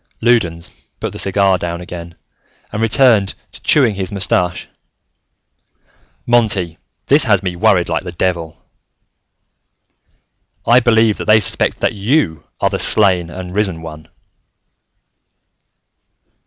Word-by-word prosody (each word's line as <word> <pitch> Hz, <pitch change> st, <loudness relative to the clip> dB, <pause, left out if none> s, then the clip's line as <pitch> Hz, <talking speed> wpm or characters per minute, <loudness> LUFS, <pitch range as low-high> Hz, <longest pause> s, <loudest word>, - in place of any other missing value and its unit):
Loudons 90 Hz, -9 st, 0 dB, 0.3 s
put -, -, -4 dB
the -, -, -8 dB
cigar 95 Hz, -1 st, +1 dB
down 85 Hz, 0 st, -4 dB
again 85 Hz, -1 st, -9 dB, 0.6 s
and 105 Hz, -, -4 dB
returned 115 Hz, -4 st, +3 dB, 0.2 s
to -, -, -14 dB
chewing 130 Hz, -8 st, +3 dB
his 95 Hz, 0 st, -4 dB
mustache. 90 Hz, -3 st, -1 dB, 1.6 s
"Monty, 105 Hz, -9 st, 0 dB, 0.3 s
this 145 Hz, +1 st, +4 dB
has 100 Hz, -5 st, +2 dB
me 90 Hz, -2 st, -3 dB
worried 90 Hz, -2 st, +2 dB
like 80 Hz, -, -2 dB
the 90 Hz, -, -7 dB
devil: 85 Hz, -2 st, -3 dB, 2.0 s
"I 120 Hz, +2 st, +5 dB
believe 110 Hz, -3 st, +2 dB
that -, -, -4 dB
they 110 Hz, 0 st, +5 dB
suspect 105 Hz, -, +1 dB
that -, -, +1 dB
you 100 Hz, -, -1 dB
are -, -, 0 dB
the -, -, -2 dB
Slain 90 Hz, -5 st, +4 dB
and 90 Hz, 0 st, -8 dB
Risen 95 Hz, -6 st, -1 dB
One!" 80 Hz, -1 st, -10 dB
95 Hz, 120 wpm, -16 LUFS, 85-110 Hz, 2.0 s, I